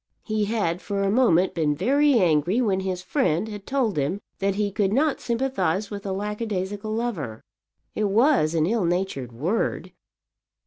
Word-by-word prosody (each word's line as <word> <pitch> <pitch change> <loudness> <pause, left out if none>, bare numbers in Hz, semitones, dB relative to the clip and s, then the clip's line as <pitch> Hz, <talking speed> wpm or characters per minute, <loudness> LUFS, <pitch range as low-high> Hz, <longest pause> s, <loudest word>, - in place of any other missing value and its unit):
He 215 -2 -1
had 200 -5 -1
for 200 -1 -2
a 195 - +1
moment 190 -7 +3
been 155 -3 +1
very 280 - +3
angry 175 - +2
when 200 -6 +1
his 185 -1 -3
friend 210 - 0
had 205 -2 -8
told 250 - 0
him 145 +8 0 0.2
that 195 0 0
he 205 0 0
could 200 -1 0
not 285 +6 +1
sympathize 225 -6 -1
with 200 -1 -6
a - - -2
lackadaisical 205 0 -3
lover. 200 - -3 0.5
It 215 - 0
was 205 - +3
an 160 -1 +3
ill 210 +1 +1
natured 170 -8 -2
word. 160 - -2
200 Hz, 165 wpm, -24 LUFS, 175-225 Hz, 0.5 s, moment